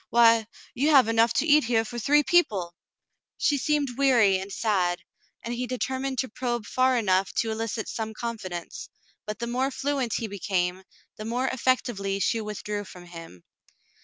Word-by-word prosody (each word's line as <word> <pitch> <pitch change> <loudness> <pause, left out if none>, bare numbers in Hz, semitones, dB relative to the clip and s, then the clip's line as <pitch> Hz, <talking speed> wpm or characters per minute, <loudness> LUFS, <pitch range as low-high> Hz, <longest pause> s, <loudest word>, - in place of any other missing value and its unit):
Why, 230 -2 +5 0.3
you 285 +5 +1
have 270 -6 +6
enough 225 0 +3
to - - +1
eat 300 -3 +5
here 225 -1 +1
for 240 +2 -6
three 295 +6 +4
people! 205 - +2 0.3
" - - -57
She 285 -2 +1
seemed 285 -4 -1
weary 235 -9 +4
and 195 +1 -7
sad, 185 -5 0 0.4
and 235 - -4
he 250 +1 -3
determined 260 +1 -3
to 260 - -5
probe 240 -1 -3
far 255 +3 +2
enough 190 -4 +1
to 225 - 0
elicit 220 0 -3
some 220 -1 -4
confidence, 195 -8 -6 0.4
but 210 -1 -4
the 235 - -4
more 255 +3 0
fluent 275 -4 -2
he 230 - -2
became, 190 -2 -2 0.3
the 215 - -7
more 245 +3 -1
effectively 235 -6 0
she 225 +3 +1
withdrew 210 -1 -4
from 180 -2 -12
him. 165 - -11
230 Hz, 170 wpm, -26 LUFS, 200-255 Hz, 0.4 s, have